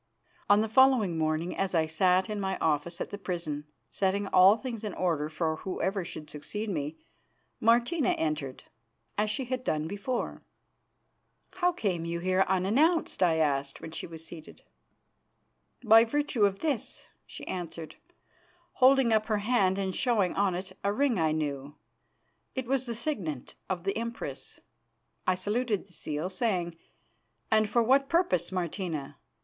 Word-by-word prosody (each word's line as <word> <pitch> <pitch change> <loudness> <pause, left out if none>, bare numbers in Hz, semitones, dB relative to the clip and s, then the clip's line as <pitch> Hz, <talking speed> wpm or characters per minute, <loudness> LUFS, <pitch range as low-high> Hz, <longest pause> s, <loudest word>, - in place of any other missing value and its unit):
On 205 +1 +6
the 220 - 0
following 240 -6 +4
morning, 160 +2 -1
as 195 -2 -1
I 160 -1 +3
sat 180 +4 +2
in 210 -1 -3
my 190 -1 -1
office 160 +2 0
at - - -4
the 205 - -6
prison, 155 -6 -4 0.2
setting 200 +1 0
all 190 +4 +7
things 230 -2 -6
in 210 -3 -4
order 160 -5 0
for 160 0 -1
whoever 190 +1 -2
should 155 -2 -8
succeed 205 +9 -5
me, 150 -2 -3 0.6
Martina 240 +6 +3
entered, 150 -4 -3 0.5
as 210 +1 +1
she 230 +5 -2
had 255 0 -3
done 155 -8 -1
before. 205 +7 -3 1.1
"How 360 -1 +1
came 195 - -2
you 170 0 -3
here 185 +2 +1
unannounced?" 230 - +2
I 175 -3 +4
asked, 140 -3 0
when 160 - -8
she - - -5
was 165 -1 -9
seated. 160 -1 -11 1.2
"By 225 0 +8
virtue 250 -3 +1
of 195 0 -5
this," 290 -8 -2 0.2
she - - -9
answered, 170 -3 -6 0.7
holding 260 -2 +5
up 215 0 +2
her 215 -2 +1
hand 205 -3 +2
and 190 -1 -2
showing 220 -8 +2
on 195 -2 +1
it 190 +1 -6
a 200 - +2
ring 255 -1 +1
I 160 -1 +2
knew. 145 -2 -3 0.8
It 260 -1 -2
was 260 +1 0
the 235 - -3
signet 195 - -3 0.2
of 180 -2 -2
the 195 +1 -1
Empress. 230 - -5 0.7
I 185 - +4
saluted 210 +2 -1
the 190 - -20
seal, 155 +1 -3
saying: 185 -4 -1 0.8
"And 215 -1 +3
for 235 +1 +3
what 270 +4 +3
purpose, 190 - +2
Martina? 175 -5 -3
190 Hz, 155 wpm, -29 LUFS, 165-230 Hz, 1.2 s, By